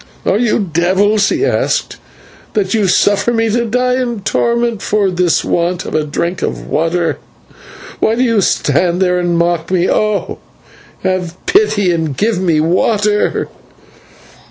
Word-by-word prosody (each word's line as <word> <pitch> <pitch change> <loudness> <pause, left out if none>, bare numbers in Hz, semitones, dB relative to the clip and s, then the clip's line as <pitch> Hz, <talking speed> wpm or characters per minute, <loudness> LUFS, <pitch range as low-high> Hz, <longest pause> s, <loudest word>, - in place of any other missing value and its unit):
"Are 200 - +2
you 235 -2 +1 0.2
devils," 200 +5 +2
he 355 +4 0
asked, - - -1 0.6
"that 195 -3 0
you 215 -3 +1
suffer 205 +4 +2
me 225 -1 0
to 235 +2 0
die 250 +2 0
in 240 -4 -3
torment 235 +1 0
for 205 -3 0
the 180 -2 +1
want 175 +1 -1
of - - -6
a 155 - +1
drink 170 +4 -3
of - - -3
water? 165 +1 -1 0.8
Why 220 - +2
do 250 - +1
you 230 -4 +2
stand 175 +1 +1
there 180 -1 +2
and 175 -1 0
mock 170 -1 0
me? 185 -1 +1
Oh! 215 -1 -1 0.6
have 180 -2 -2
pity 360 - +2
and 160 -5 -2
give 215 -1 0
me 165 -4 +2
water." 205 +6 +1
195 Hz, 150 wpm, -14 LUFS, 175-225 Hz, 0.8 s, Are